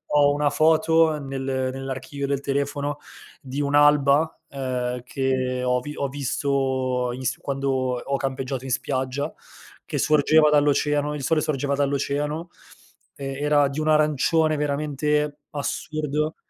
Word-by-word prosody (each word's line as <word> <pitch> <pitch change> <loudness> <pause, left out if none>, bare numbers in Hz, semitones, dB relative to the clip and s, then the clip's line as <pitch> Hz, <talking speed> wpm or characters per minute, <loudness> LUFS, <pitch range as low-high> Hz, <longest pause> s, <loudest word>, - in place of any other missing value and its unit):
ho 145 -1 +5
una 145 0 +1
foto 160 +1 +3
nel 135 -2 -5
nell'archivio 135 +1 -3
del 140 -1 0
telefono 140 +1 -2 0.4
di 135 +2 -4
un'alba, 145 +1 +3
ehm, 125 -2 -3
che 130 -1 -1
ho 125 0 +2
vi 150 +4 -7
ho 140 - -1
visto 130 -2 -1
in 130 +1 -7
s - - -1
quando 135 0 -3 0.3
ho 140 - -1
campeggiato 135 -1 -3
in 130 - -5
spiaggia, 130 +3 -2 0.5
che - - -4
sorgeva 150 +1 +4
dall'oceano 150 0 +2
il 145 - -5
sole 155 +3 +2
sorgeva 140 -2 -1
dall'oceano, 145 +3 -1 0.7
ehm, 135 0 -5
era 145 -1 +4
di 140 - -4
un 155 - -1
arancione 155 +1 +3
veramente 150 0 -1
assurdo, 150 +1 -2
140 Hz, 130 wpm, -24 LUFS, 135-150 Hz, 0.7 s, ho